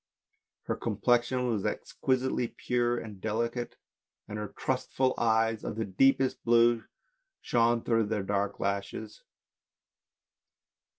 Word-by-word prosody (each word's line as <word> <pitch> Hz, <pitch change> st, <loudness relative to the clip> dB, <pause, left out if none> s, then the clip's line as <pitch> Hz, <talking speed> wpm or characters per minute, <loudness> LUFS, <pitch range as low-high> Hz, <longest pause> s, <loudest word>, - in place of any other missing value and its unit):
Her -, -, -2 dB
complexion 120 Hz, +3 st, +1 dB
was 110 Hz, -5 st, 0 dB
exquisitely 130 Hz, -2 st, -1 dB
pure 120 Hz, 0 st, +1 dB
and 105 Hz, -5 st, -8 dB
delicate, 115 Hz, +2 st, -2 dB, 0.5 s
and 105 Hz, 0 st, -5 dB
her 105 Hz, -, -3 dB
trustful 130 Hz, +3 st, -1 dB
eyes 110 Hz, -1 st, +2 dB
of -, -, -4 dB
the 110 Hz, 0 st, -2 dB
deepest 135 Hz, +7 st, +2 dB
blue 120 Hz, 0 st, +4 dB, 0.6 s
shone 120 Hz, 0 st, +2 dB
through 115 Hz, -2 st, +2 dB
their 105 Hz, -2 st, -1 dB
dark 100 Hz, 0 st, -1 dB
lashes. 100 Hz, +2 st, -3 dB
115 Hz, 110 wpm, -29 LUFS, 105-120 Hz, 0.6 s, blue